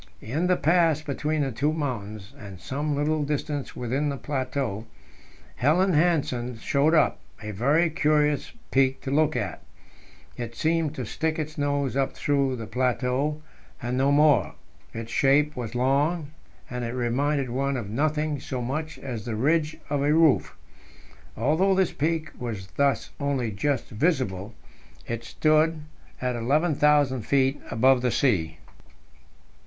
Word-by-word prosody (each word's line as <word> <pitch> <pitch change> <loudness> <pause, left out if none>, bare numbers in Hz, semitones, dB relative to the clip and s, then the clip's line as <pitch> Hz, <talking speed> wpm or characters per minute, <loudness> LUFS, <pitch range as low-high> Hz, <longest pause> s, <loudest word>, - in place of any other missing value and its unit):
In 155 +11 -2
the 180 -1 +3
pass 165 -2 +3
between 150 +1 -1
the 135 -2 -1
two 145 +6 0
mountains, 110 -8 -4
and 100 -8 -10
some 145 +6 -2
little 150 +1 0
distance 145 -1 -3
within 130 +5 -1
the 140 - -3
plateau, 130 -6 -3 0.7
Helland 175 +8 +3
Hansen 140 -7 +1
showed 145 +7 +2
up, - - +3 0.2
a 105 - -4
very 140 - +2
curious 150 -2 +1 0.2
peak 135 0 +3
to 135 - -4
look 155 +2 +2
at. - - -3 0.8
It 115 -1 -6
seemed 160 +1 0
to - - -4
stick 160 0 -2
its 155 -1 -4
nose 145 -2 -1
up 135 0 0
through 140 -2 0
the 115 -2 -6
plateau, 130 +5 -1 0.4
and 120 +1 -3
no 135 +2 +2
more; 145 - +4 0.4
its 115 0 -7
shape 145 +4 +3
was 120 -1 -5
long, 145 +5 +1 0.4
and 125 -4 -4
it 115 0 -3
reminded 130 +2 0
one 135 +2 -1
of 115 -5 -5
nothing 150 +5 -1
so 130 0 -5
much 155 +6 -3
as 120 -6 -6
the 115 -3 -3
ridge 155 +6 +1
of 145 -1 -1
a 145 +1 +2
roof. 160 -3 +3 0.8
Although 160 - +2
this 190 -1 +1
peak 155 +1 -1
was 110 -6 -5
thus 140 -4 +1
only 135 -5 -1
just 135 +6 -1
visible, 110 - -1 0.5
it 115 0 -4
stood 155 +1 +2 0.4
11,000 140 +2 +2
feet 135 +4 +1
above 130 +2 +4
the 125 - +1
sea. 105 - +1
140 Hz, 145 wpm, -26 LUFS, 125-155 Hz, 0.8 s, more